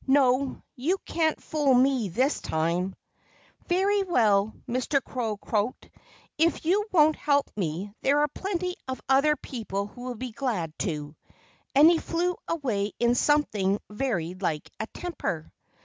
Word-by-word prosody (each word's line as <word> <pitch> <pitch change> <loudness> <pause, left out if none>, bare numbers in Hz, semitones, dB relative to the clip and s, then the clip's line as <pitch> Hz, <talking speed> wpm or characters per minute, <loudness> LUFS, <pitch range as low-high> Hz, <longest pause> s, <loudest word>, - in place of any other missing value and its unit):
No! 265 -1 +3
You 315 +10 0
can't 320 -2 0
fool 290 -4 +2
me 255 -4 +3
this 260 - +1
time!" 170 +4 -1 0.7
"Very 390 +3 +2
well!" 220 - +3 0.2
Mr. 255 +3 +1
Crow 230 -5 -3
croaked. 215 +3 -2 0.5
"If 325 0 +2
you 405 +5 +2
won't 310 -3 +5
help 285 -1 +1
me, 190 +1 -3
there 280 +2 +3
are 295 - +3
plenty 365 +2 -3
of 260 0 -4
other 275 +3 +4
people 220 -7 -4
who'll 245 +4 -7
be 250 +2 -5
glad 215 - -2
to." 150 -3 -3 0.6
And 290 +3 +8
he 335 -1 +5
flew 350 +2 -1
away 225 - -1
in 235 0 +3
something 215 -9 +2
very 210 -8 -1
like 170 -5 -3
a 220 - -3
temper. 225 - -5
255 Hz, 140 wpm, -27 LUFS, 200-300 Hz, 0.7 s, And